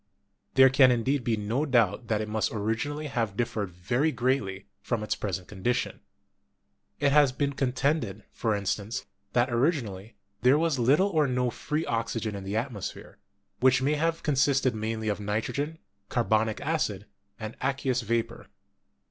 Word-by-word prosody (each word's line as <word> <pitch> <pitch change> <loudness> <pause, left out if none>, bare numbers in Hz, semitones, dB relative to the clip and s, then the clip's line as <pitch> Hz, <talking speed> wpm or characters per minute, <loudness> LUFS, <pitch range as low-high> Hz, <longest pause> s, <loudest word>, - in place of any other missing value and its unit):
There 135 -1 +7
can 135 -1 +6
indeed 125 +3 +1
be 115 -1 0
no 110 +7 -1
doubt 120 -5 +2
that 110 -1 +1
it 110 - -3
must 110 0 -1
originally 115 +8 -2
have 115 -8 -2
differed 110 -4 -1
very 120 - 0
greatly 120 -8 -1 0.2
from 115 0 -2
its 105 - 0
pres 95 -5 -2
ent 90 - -15
condition. 105 +5 -2 1.0
It 140 -1 +3
has 145 -2 +5
been 140 +2 -1
contended, 130 -5 0
for 110 -2 0
instance, 100 +2 -2 0.3
that 120 0 +2
originally 115 - -1 0.3
there 125 +4 +5
was 160 -4 +1
little 145 +12 +4
or 155 -6 +2
no 125 -1 0
free 150 +6 -2
oxygen 115 -1 -2
in 100 - -6
the 100 +3 -2
at 125 +4 -1
mosphere, 100 -4 -7 0.4
which 130 +1 +4
may 145 +3 +2
have 165 +2 0
consisted 135 -2 +2
mainly 110 0 -3
of 105 -1 0
nitrogen, 115 +9 -2 0.3
carbonic 110 -2 +1
acid, 140 -10 -1 0.3
and 110 0 -6
aqueous 135 -2 0
vapor. 115 +1 -2
120 Hz, 155 wpm, -28 LUFS, 110-140 Hz, 1.0 s, There